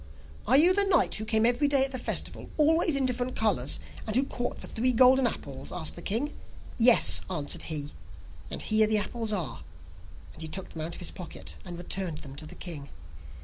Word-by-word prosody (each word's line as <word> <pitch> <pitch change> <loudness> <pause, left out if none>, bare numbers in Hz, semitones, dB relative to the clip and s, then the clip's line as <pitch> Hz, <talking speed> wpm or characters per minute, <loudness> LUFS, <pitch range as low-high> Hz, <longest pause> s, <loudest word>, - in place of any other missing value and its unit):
'Are 260 - +6
you 345 +5 +6
the 405 +1 +5
knight 390 -3 +2
who 215 - 0
came 220 0 +2
every 245 +4 +3
day 275 -2 +3
to 270 - -5
the 255 - -4
festival, - - -2
always 320 0 +3
in 275 -1 +2
different 250 0 -2
colours, 190 - 0 0.3
and 215 - -3
who 260 - +4
caught 245 -3 -4
the - - -7
three 250 +3 +1
golden 255 +1 +5
apples?' 140 - -6
asked 165 -4 -3
the 170 - -8
king. 240 - -1 0.5
'Yes,' 235 0 +6
answered 150 -6 -3
he, 150 -2 -4 0.6
'and - - -5
here 215 0 +3
the 215 0 +2
apples 225 +1 -2
are,' 185 -7 -3 0.7
and - - -12
he 160 - -3
took 190 +4 -3
them 160 - -8
out 165 +2 -4
of - - -10
his 175 - -3
pocket, 180 -4 -7
and 175 -2 -8
returned 175 -2 -3
them 140 -3 -10
to 155 - -7
the - - -11
king. 150 -6 -7
220 Hz, 210 wpm, -28 LUFS, 170-255 Hz, 0.7 s, Are